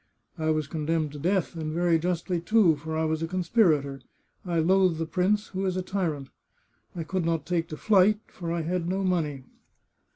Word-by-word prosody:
I 160 Hz, 0 st, 0 dB
was 155 Hz, -1 st, +1 dB
condemned 155 Hz, 0 st, -1 dB
to 145 Hz, -, -8 dB
death, 180 Hz, +3 st, 0 dB
and 155 Hz, -1 st, -3 dB
very 170 Hz, 0 st, +2 dB
justly, 175 Hz, +1 st, -1 dB
too, 190 Hz, -3 st, +4 dB
for 160 Hz, +2 st, -5 dB
I 160 Hz, -, +1 dB
was 160 Hz, 0 st, -1 dB
a 165 Hz, -, -1 dB
conspirator; 165 Hz, -, +1 dB, 0.4 s
I 175 Hz, -2 st, -2 dB
loathe 185 Hz, +1 st, +3 dB
the 165 Hz, -, -2 dB
prince, 200 Hz, +5 st, 0 dB
who 190 Hz, 0 st, -3 dB
is 185 Hz, 0 st, -1 dB
a 185 Hz, -, -1 dB
tyrant. 165 Hz, -8 st, -2 dB, 0.7 s
I 170 Hz, -, -3 dB
could 185 Hz, +2 st, -2 dB
not 165 Hz, -1 st, -1 dB
take 170 Hz, -1 st, -1 dB
to 155 Hz, -, -7 dB
flight, 205 Hz, +1 st, +4 dB
for 170 Hz, -2 st, -6 dB
I 170 Hz, -1 st, -1 dB
had 175 Hz, +1 st, -2 dB
no 190 Hz, +1 st, -1 dB
money. 155 Hz, -7 st, -1 dB
170 Hz, 195 wpm, -27 LUFS, 160-185 Hz, 0.7 s, too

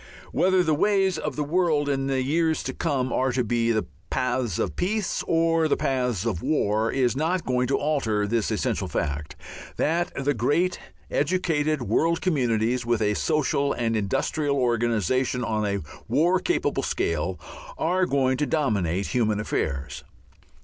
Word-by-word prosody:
Whether 185 Hz, 0 st, +3 dB
the 160 Hz, -2 st, +1 dB
ways 190 Hz, +2 st, +2 dB
of -, -, -3 dB
the 150 Hz, -, -1 dB
world 155 Hz, -2 st, +1 dB
in 135 Hz, -1 st, 0 dB
the 135 Hz, -1 st, 0 dB
years 160 Hz, +3 st, +1 dB
to -, -, -4 dB
come 135 Hz, -6 st, -1 dB
are 130 Hz, 0 st, +1 dB
to 125 Hz, 0 st, +1 dB
be 115 Hz, +1 st, +1 dB
the 110 Hz, -1 st, 0 dB, 0.2 s
paths 125 Hz, -2 st, -1 dB
of -, -, -2 dB
peace 200 Hz, +2 st, -1 dB
or 165 Hz, -1 st, +2 dB
the -, -, +1 dB
paths 125 Hz, -6 st, -1 dB
of 100 Hz, -8 st, -1 dB
war 110 Hz, -7 st, +1 dB
is 125 Hz, -3 st, +1 dB
not 165 Hz, +5 st, 0 dB
going 125 Hz, 0 st, +1 dB
to 135 Hz, -, +1 dB
alter 115 Hz, -9 st, 0 dB
this 110 Hz, +1 st, 0 dB
essential -, -, -1 dB
fact, 75 Hz, 0 st, -3 dB, 0.4 s
that 170 Hz, +3 st, 0 dB
the 140 Hz, +1 st, 0 dB
great 145 Hz, +10 st, +1 dB, 0.3 s
educated 155 Hz, -3 st, 0 dB
world 165 Hz, +7 st, +1 dB
communities, 125 Hz, -, +1 dB
with 120 Hz, -1 st, +1 dB
a 105 Hz, 0 st, +2 dB
social 140 Hz, -, +1 dB
and 115 Hz, -1 st, -1 dB
industrial 140 Hz, +8 st, 0 dB
organization 120 Hz, +1 st, +1 dB
on 110 Hz, -2 st, -1 dB
a 100 Hz, 0 st, -1 dB, 0.3 s
war 175 Hz, +5 st, +3 dB
capable 350 Hz, -, 0 dB
scale, -, -, -1 dB, 0.4 s
are 185 Hz, 0 st, +1 dB
going 130 Hz, -2 st, +1 dB
to 150 Hz, +1 st, 0 dB
dominate 100 Hz, -, 0 dB
human 110 Hz, -5 st, +1 dB
affairs. 70 Hz, -9 st, -3 dB
130 Hz, 155 wpm, -25 LUFS, 115-160 Hz, 0.4 s, Whether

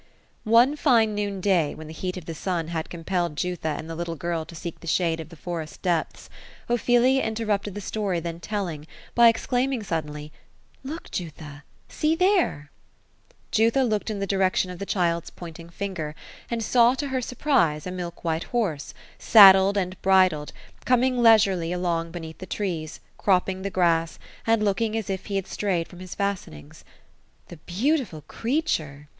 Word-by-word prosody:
One 240 Hz, +6 st, +6 dB
fine 230 Hz, -8 st, +3 dB
noon 200 Hz, -2 st, -3 dB
day^ 175 Hz, -7 st, +2 dB
when 155 Hz, -, -9 dB
the 155 Hz, -, -9 dB
heat 180 Hz, +3 st, -4 dB
of 180 Hz, -, -8 dB
the 165 Hz, -, -5 dB
sun 165 Hz, -1 st, -3 dB
had 160 Hz, -2 st, -3 dB
compelled 175 Hz, -1 st, -2 dB
Jutha 165 Hz, -2 st, -2 dB
and 160 Hz, -, -7 dB
the 165 Hz, -, -5 dB
little 165 Hz, 0 st, -4 dB
girl 165 Hz, 0 st, -3 dB
to 165 Hz, -, -12 dB
seek 170 Hz, +1 st, -7 dB
the 170 Hz, -, -12 dB
shade 165 Hz, 0 st, +1 dB
of 160 Hz, -, -7 dB
the 170 Hz, -, -12 dB
forest 165 Hz, -1 st, -6 dB
depths, 175 Hz, -4 st, -1 dB, 0.4 s
Ophelia 245 Hz, +2 st, +3 dB
inter 220 Hz, +1 st, -2 dB
rupted 205 Hz, -1 st, -1 dB
the 205 Hz, -, -5 dB
story 200 Hz, -3 st, -2 dB
then 170 Hz, 0 st, -5 dB
telling, 170 Hz, -6 st, -4 dB, 0.3 s
by 235 Hz, 0 st, +7 dB
exclaiming 245 Hz, +1 st, +1 dB
suddenly: 150 Hz, -4 st, -4 dB, 0.3 s
— -, -, -32 dB
^^ -, -, -5 dB
Look 320 Hz, +3 st, -7 dB
Jutha 150 Hz, -5 st, -6 dB
t -, -, -31 dB, 0.2 s
See 310 Hz, +1 st, 0 dB
there 360 Hz, -, +1 dB
I" -, -, -36 dB, 0.2 s
Jutha 230 Hz, +5 st, +3 dB
looked 215 Hz, -3 st, -1 dB
in 215 Hz, -, -3 dB
the 200 Hz, -, -1 dB
direction 190 Hz, -1 st, +1 dB
of 180 Hz, -, -9 dB
the 200 Hz, -, -5 dB
child's 170 Hz, -3 st, 0 dB
pointing 170 Hz, -1 st, -10 dB
finger, 170 Hz, -5 st, -5 dB, 0.3 s
and 230 Hz, -1 st, -2 dB
saw 240 Hz, +2 st, +4 dB
to 285 Hz, +1 st, -3 dB
her 260 Hz, -1 st, -1 dB
surprise, 230 Hz, -, +1 dB
a 180 Hz, -, -4 dB
milk 175 Hz, -2 st, -6 dB
white 165 Hz, -1 st, -1 dB
horse, 195 Hz, -, -2 dB, 0.2 s
saddled 195 Hz, -2 st, +8 dB
and 185 Hz, -1 st, -2 dB
bridled, 185 Hz, -6 st, +3 dB, 0.3 s
coming 250 Hz, 0 st, +2 dB
leisurely 200 Hz, -7 st, +4 dB
along 170 Hz, -2 st, -1 dB
beneath 165 Hz, -2 st, -8 dB
the 185 Hz, -, -8 dB
trees, 170 Hz, -6 st, -4 dB, 0.2 s
cropping 190 Hz, -1 st, +1 dB
the 200 Hz, -, -3 dB
grass, 165 Hz, -3 st, +1 dB, 0.3 s
and 225 Hz, -1 st, +3 dB
looking 215 Hz, +2 st, 0 dB
as 215 Hz, -3 st, -3 dB
if 190 Hz, -1 st, -5 dB
he 200 Hz, -, -3 dB
had 195 Hz, -2 st, -1 dB
strayed 185 Hz, -6 st, -1 dB
from 180 Hz, -, -13 dB
his 185 Hz, -1 st, -8 dB
fastenings. 180 Hz, -, -4 dB, 0.3 s
" -, -, -38 dB
The 175 Hz, -, -10 dB
beautiful 205 Hz, -, -1 dB
creature 155 Hz, -, -2 dB
185 Hz, 180 wpm, -25 LUFS, 165-220 Hz, 0.4 s, saddled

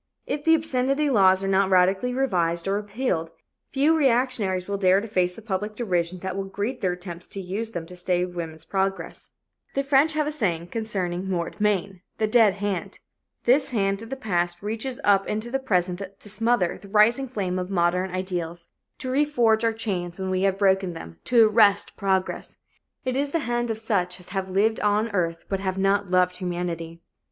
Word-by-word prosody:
If 290 Hz, 0 st, -3 dB
the 325 Hz, +1 st, +6 dB
obscenity 280 Hz, -1 st, 0 dB
laws 190 Hz, -4 st, +4 dB
are -, -, -1 dB
not 195 Hz, 0 st, +3 dB
radically 190 Hz, +6 st, +3 dB
revised 175 Hz, -10 st, 0 dB
or 195 Hz, -, +1 dB
repealed, 205 Hz, -5 st, -2 dB, 0.4 s
few 290 Hz, +4 st, +3 dB
reactionaries 240 Hz, -, +1 dB
will 200 Hz, 0 st, -2 dB
dare 190 Hz, 0 st, +4 dB
to 220 Hz, -, -6 dB
face 180 Hz, -4 st, 0 dB
the 225 Hz, -, -12 dB
public 210 Hz, 0 st, -3 dB
derision 185 Hz, -6 st, -1 dB
that 190 Hz, -1 st, -4 dB
will 195 Hz, 0 st, -3 dB
greet 205 Hz, +6 st, -4 dB
their 185 Hz, -3 st, +1 dB
attempts 175 Hz, -1 st, -8 dB
to 200 Hz, -, -6 dB
use 195 Hz, +5 st, -3 dB
them 175 Hz, -7 st, -5 dB
to 180 Hz, +2 st, -11 dB
stay 180 Hz, 0 st, 0 dB
woman's 165 Hz, -3 st, -7 dB
progress. 195 Hz, +2 st, -3 dB, 0.5 s
The 275 Hz, -, +1 dB
French 280 Hz, +3 st, +3 dB
have 305 Hz, -1 st, +1 dB
a 300 Hz, -, -1 dB
saying 175 Hz, -, -1 dB
concerning 190 Hz, -5 st, -3 dB
"mort 175 Hz, +2 st, -3 dB
main" 195 Hz, -3 st, 0 dB, 0.2 s
the 220 Hz, -, +1 dB
dead 215 Hz, -3 st, +4 dB
hand. 200 Hz, -3 st, -3 dB, 0.5 s
This 265 Hz, +4 st, +3 dB
hand 195 Hz, -4 st, 0 dB
of 225 Hz, -, -9 dB
the 270 Hz, -, -3 dB
past 175 Hz, -7 st, -1 dB
reaches 225 Hz, +4 st, -4 dB
up 195 Hz, -1 st, +3 dB
into 215 Hz, +3 st, -3 dB
the 270 Hz, -, 0 dB
present 180 Hz, -6 st, 0 dB, 0.2 s
to 205 Hz, -, -8 dB
smother 225 Hz, -3 st, +1 dB
the 200 Hz, -, -13 dB
rising 225 Hz, +6 st, +4 dB
flame 190 Hz, -7 st, -2 dB
of 180 Hz, 0 st, -4 dB
modern 180 Hz, 0 st, +1 dB
ideals, 175 Hz, -2 st, -4 dB, 0.3 s
to 265 Hz, -, -6 dB
reforge 245 Hz, -6 st, +2 dB
our 230 Hz, -, +3 dB
chains 190 Hz, -6 st, -4 dB
when 190 Hz, -1 st, -3 dB
we 185 Hz, 0 st, 0 dB
have 195 Hz, 0 st, +2 dB
broken 190 Hz, -2 st, +2 dB
them, 85 Hz, -, -10 dB
to 235 Hz, -3 st, +6 dB
arrest 210 Hz, -2 st, +3 dB
progress. 190 Hz, -2 st, -1 dB, 0.5 s
It 255 Hz, 0 st, -1 dB
is 280 Hz, +1 st, -1 dB
the -, -, +3 dB
hand 240 Hz, 0 st, -1 dB
of 225 Hz, -, -2 dB
such 190 Hz, -5 st, -1 dB
as 180 Hz, -, -14 dB
have 190 Hz, 0 st, -3 dB
lived 210 Hz, +4 st, +2 dB
on 210 Hz, +2 st, +1 dB
earth 165 Hz, -4 st, -1 dB
but 195 Hz, -, -2 dB
have 190 Hz, -1 st, -2 dB
not 195 Hz, 0 st, +1 dB
loved 180 Hz, 0 st, +2 dB
humanity. 175 Hz, -2 st, -4 dB
195 Hz, 195 wpm, -25 LUFS, 180-225 Hz, 0.5 s, the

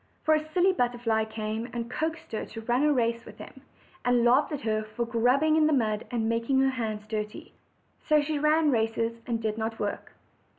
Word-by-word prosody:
For 315 Hz, -, +4 dB
a 310 Hz, -, +4 dB
silly 365 Hz, +3 st, +3 dB
butterfly 240 Hz, -5 st, 0 dB
came 220 Hz, +1 st, -4 dB
and 235 Hz, -1 st, -4 dB
coaxed 320 Hz, +6 st, -4 dB
her 220 Hz, -, -3 dB
to 225 Hz, -, -8 dB
run 240 Hz, +3 st, +1 dB
a 300 Hz, 0 st, +4 dB
race 235 Hz, -3 st, 0 dB
with -, -, -13 dB
him, -, -, -11 dB, 0.4 s
and 245 Hz, -1 st, +3 dB
laughed 260 Hz, +6 st, +4 dB
at 295 Hz, -, -3 dB
her 215 Hz, -1 st, 0 dB
for 215 Hz, +3 st, -4 dB
grubbing 250 Hz, +7 st, +2 dB
in 310 Hz, -1 st, +4 dB
the 310 Hz, -, +2 dB
ground, 215 Hz, -5 st, 0 dB
and 230 Hz, -3 st, -1 dB
making 230 Hz, +4 st, +1 dB
her 270 Hz, 0 st, +3 dB
hands 220 Hz, -4 st, -4 dB
dirty. 210 Hz, -1 st, -5 dB, 0.5 s
So 305 Hz, -1 st, +3 dB
she 295 Hz, 0 st, -1 dB
ran 305 Hz, 0 st, +3 dB
races, 230 Hz, 0 st, 0 dB
and 235 Hz, -2 st, -1 dB
did 220 Hz, 0 st, -2 dB
not 225 Hz, 0 st, -3 dB
work. 205 Hz, -1 st, -4 dB
235 Hz, 205 wpm, -27 LUFS, 225-285 Hz, 0.5 s, For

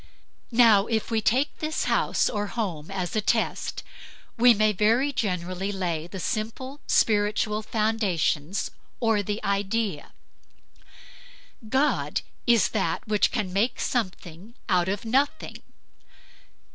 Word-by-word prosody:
Now 225 Hz, -4 st, +6 dB
if 225 Hz, 0 st, -1 dB
we 225 Hz, -1 st, +1 dB
take 260 Hz, +7 st, +1 dB
this 310 Hz, 0 st, -2 dB
house -, -, +1 dB
or 205 Hz, -2 st, -2 dB
home 190 Hz, -10 st, -4 dB
as 185 Hz, -2 st, -3 dB
a 215 Hz, -, +2 dB
test, 225 Hz, +2 st, -1 dB, 0.5 s
we 245 Hz, +1 st, +6 dB
may 215 Hz, -1 st, +3 dB
very 230 Hz, +8 st, +2 dB
generally 185 Hz, -3 st, -2 dB
lay 170 Hz, -5 st, -3 dB
the 190 Hz, +2 st, -7 dB
simple 245 Hz, +7 st, -4 dB
spiritual 210 Hz, 0 st, +2 dB
foundations 205 Hz, -6 st, -1 dB, 0.3 s
of 225 Hz, -4 st, +1 dB
the 210 Hz, +1 st, -1 dB
idea. 200 Hz, -4 st, -1 dB, 1.6 s
God 270 Hz, +5 st, +1 dB, 0.3 s
is 235 Hz, -2 st, +4 dB
that 190 Hz, -5 st, -2 dB
which 210 Hz, -1 st, +3 dB
can 205 Hz, -6 st, -2 dB
make 210 Hz, +6 st, +1 dB
something 190 Hz, -2 st, -4 dB
out 180 Hz, -1 st, +2 dB
of 200 Hz, +3 st, -3 dB
nothing. 270 Hz, +6 st, 0 dB
210 Hz, 120 wpm, -26 LUFS, 190-230 Hz, 1.6 s, Now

